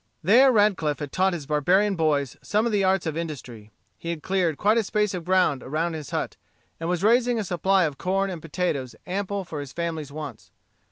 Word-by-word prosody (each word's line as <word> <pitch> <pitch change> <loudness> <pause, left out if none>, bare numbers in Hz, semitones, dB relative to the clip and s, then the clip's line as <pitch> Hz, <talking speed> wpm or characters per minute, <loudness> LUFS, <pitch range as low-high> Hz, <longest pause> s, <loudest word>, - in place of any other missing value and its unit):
There 250 +10 +6
Radcliff 205 -9 +2
had 145 -2 -6
taught 190 +1 +2
his 160 -5 -5
barbarian 180 +8 +2
boys 145 -5 0
some 215 +2 0
of 235 - 0
the 205 -2 +2
arts 190 -1 +2
of 160 -2 -2
industry. 130 -10 -6 0.3
He 170 - -6
had 165 -3 -4
cleared 180 -6 0
quite 215 +3 +3
a - - +1
space 210 0 0
of 180 -2 -4
ground 180 -7 +2
around 160 +5 -2
his 155 -5 -6
hut, - - -3 0.4
and 165 +1 -3
was 180 0 -1
raising 240 +2 +3
a 220 - -1
supply 190 +1 +2
of 150 -4 -2
corn 195 +1 0
and 170 -3 -6
potatoes 150 -7 -2
ample 200 +1 -3
for 155 -3 -6
his 140 -2 -7
family 170 -2 -3
wants. 150 +1 -8
175 Hz, 210 wpm, -25 LUFS, 155-195 Hz, 0.4 s, There